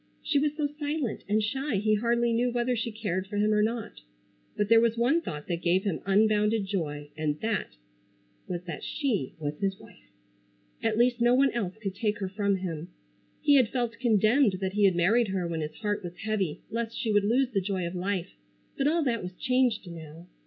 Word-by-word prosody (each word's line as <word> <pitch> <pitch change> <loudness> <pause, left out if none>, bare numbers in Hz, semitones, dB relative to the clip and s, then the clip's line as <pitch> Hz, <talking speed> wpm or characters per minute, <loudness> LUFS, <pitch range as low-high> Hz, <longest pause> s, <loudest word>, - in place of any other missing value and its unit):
She 290 -2 +2
was 295 +1 0
so 300 - +1
silent 290 -5 -2
and 215 +1 +2
shy 265 +4 -1
he 215 +2 +2
hardly 235 +2 +2
knew 240 +2 +2
whether 245 +1 0
she 230 0 -2
cared 195 -4 -3
for 205 +1 -4
him 210 +1 +3
or 210 - +3
not. 225 +1 -2 0.6
But 205 - +1
there 225 +1 +6
was 230 0 +2
one 265 +9 +3
thought 150 - -6
that 170 -1 -3
gave 180 +2 +2
him 195 -6 -2
unbounded 210 +1 +3
joy 150 -7 -3
and 155 -1 -1
that 220 -1 -2 0.7
was 175 -1 -4
that 170 -4 -7
she 235 - -2
was 150 -1 -4
his 195 -1 -1
wife. - - -17 0.7
At 225 -1 0
least 240 0 +3
no 240 +1 +5
one 270 0 +4
else 205 -4 -3
could 200 -3 -4
take 210 +1 -1
her 190 -2 -3
from 200 0 0
him. 175 -4 -4 0.5
He 290 -2 +5
had 250 -5 +4
felt 235 -2 -2
condemned 225 0 +4
that 190 0 -3
he 205 0 +3
had 190 -3 +4
married 210 +7 +3
her 190 -2 -1
when 165 -1 -3
his 155 0 -5
heart 210 -2 -2
was 175 0 -7
heavy 200 -8 -1
lest 230 0 -3
she 225 - -1
would 205 -1 +3
lose 250 +5 +2
the 200 -4 +1
joy 190 -1 -2
of 170 - -4
life, 185 0 -2 0.5
but 275 - +3
all 325 +2 +2
that 235 -5 0
was 180 +1 -6
changed 250 -2 +1
now. 165 -1 -10
210 Hz, 210 wpm, -28 LUFS, 185-235 Hz, 0.7 s, there